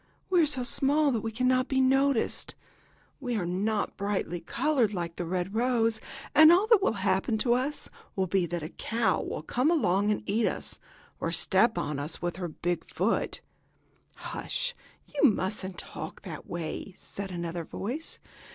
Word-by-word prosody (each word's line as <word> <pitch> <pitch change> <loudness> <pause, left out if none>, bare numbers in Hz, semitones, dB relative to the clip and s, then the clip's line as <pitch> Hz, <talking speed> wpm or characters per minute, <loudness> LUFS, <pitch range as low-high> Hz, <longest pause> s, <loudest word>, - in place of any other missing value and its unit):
We 360 -2 +5
are 310 - +4
so 260 -4 -1
small 285 +3 +2
that 230 -4 0
we 225 - -3
cannot 255 +2 +2
be 265 - +1
noticed. 270 -1 +2 0.6
We 245 -4 -2
are 195 -5 -1
not 200 +4 -1
brightly 195 -4 -1
colored, 250 - +1
like 170 -2 -3
the 175 - -4
red 180 +2 -2
rose, 230 -2 +2 0.3
and 315 +1 +9
all 365 +4 +5
that 445 -3 +5
will 390 - +2
happen 195 +3 +2
to 235 +2 +3
us 265 +4 -1 0.3
will 190 - +1
be 185 -1 +1
that 175 -1 -3
a 155 - -5
cow 220 -1 0
will - - -4
come 250 - +1
along 205 - +2
and 210 - 0
eat 220 +3 +2
us, - - -3 0.4
or 165 - -1
step 190 +7 +3
on 145 -1 -2
us 150 +3 -3
with 175 0 -3
her 180 -2 -3
big 175 +2 -3
foot." - - 0 0.7
"Hush! - - -3 0.3
You 290 -1 +4
musn't 190 -2 -2
talk - - -7
that - - -8
way," 175 +2 -5
said 200 -1 -7
another 170 -1 -4
voice. 250 - -4
215 Hz, 170 wpm, -29 LUFS, 180-260 Hz, 0.7 s, and